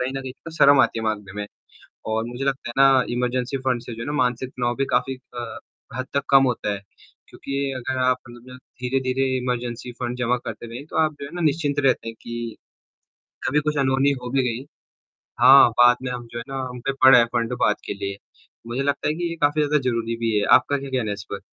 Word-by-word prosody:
कहीं 125 +1 -1
न - - -5
कहीं 130 -1 -6
तो 165 - -7
शर्म 140 -2 +7
आती 115 - +2
है 110 - -4
माँगने 105 -3 -3
में, 105 - -4 0.6
और 110 +1 -1
मुझे 120 +3 -5
लगता 135 -3 -2
है - - -6
ना 135 -2 +6
इमरजेंसी 125 +2 -1
फंड 130 -2 -1
से 120 - -8
जो 115 - -8
है - - -4
ना 145 - -2
मानसिक 125 +1 -2
तनाव 120 -2 -2
भी 135 +1 0
काफ़ी 125 +2 +1
अ, 120 -2 -8 0.4
हद 130 - -2
तक 140 - +1
कम 135 -1 +7
होता 115 -4 -1
है। 100 - -6 0.5
क्योंकि 140 0 -4
अगर 130 +1 -3
आप 130 0 +3
मतलब 120 +1 -12
ज - - -12 0.2
धीरे-धीरे 130 +1 0
इमरजेंसी 125 -1 -3
फंड 125 0 -3
जमा 125 0 +1
करते 120 - -6
रहें, 120 +5 -8
तो - - -10
आप 155 -1 +2
जो - - -4
है 140 - -10
ना 175 - -3
निश्चिंत 145 -2 +1
रहते 125 -3 +2
हैं 115 - -6
कि, 120 -1 -6 0.9
कभी 145 +3 +2
कुछ 150 0 -2
अनहोनी 135 +1 +3
हो 125 - -5
भी 135 +1 +2
गई 120 +3 -4 0.8
हाँ, 130 +1 +8
बाद 120 0 +6
में 125 - -3
हम 120 -1 -6
जो 120 - -6
है 120 - -4
ना, 135 - -4
हम 125 0 -8
पे 135 - +1
पड़ा 130 -1 +9
है 120 - +6
फंड 120 0 0
बाद - - +3
के - - -3
लिए। 100 0 -5 0.5
मुझे 120 +3 -2
लगता 140 +1 0
है 150 - +1
कि 170 +2 -3
ये 165 - -4
काफ़ी 145 +1 +3
ज़्यादा 150 0 +2
ज़रूरी 115 -1 -2
भी 115 -2 0
है। 100 - 0
आपका 145 - -2
क्या 140 0 -7
कहना 125 -5 -1
है - - 0
इस 100 -1 -8
पर? - - -4
125 Hz, 240 wpm, -23 LUFS, 120-135 Hz, 0.9 s, पड़ा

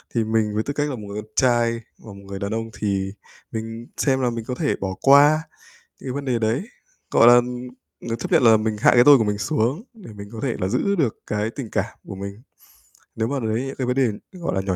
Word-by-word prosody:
thì 115 - +2
mình 110 -1 0
với 110 - 0
tư 145 - -4
cách 145 +1 -1
là 135 - -3
một 115 - -9
người 100 +1 -5
con 110 0 -18
trai 120 -2 +3 0.3
và 110 - -12
một 100 0 -13
người 100 0 -5
đàn 100 +1 -3
ông, 115 0 -3
thì 95 -2 -1 0.4
mình 115 +1 -6
xem 135 -2 +1
là 125 - +2
mình 115 -1 -5
có 125 - -4
thể 150 +2 0
bỏ 95 -1 -3
qua 145 +3 +6 0.6
những - - -7
cái - - -4
vấn 140 0 -4
đề 125 -3 0
đấy, 115 - 0 0.5
gọi 115 - +5
là, 120 - +9
ưm, 125 +1 0 0.4
ờ, 115 - -1
chấp 120 - -6
nhận - - +5
là 115 -2 +7
mình 110 0 -1
hạ - - +5
cái 120 0 +6
tôi 145 -1 +8
của 110 - +1
mình 105 -1 -1
xuống 115 - 0
để 205 - -12
mình 100 0 -10
có 115 - -8
thể 125 -4 -1
là 95 - 0
giữ 200 - 0
được 135 - 0
cái 105 +1 -1
tình 120 -3 -7
cảm - - -3
của - - -5
mình, 100 +3 -8 0.7
nếu 110 0 -1
mà 140 +2 -2
đấy 110 0 -1
những 135 - -6
cái 130 -2 -2
vấn 125 - 0
đề, 135 - +4 0.3
gọi 175 -2 -3
là, 95 - 0
nhỏ 95 -1 -2
115 Hz, 265 wpm, -22 LUFS, 105-130 Hz, 0.7 s, là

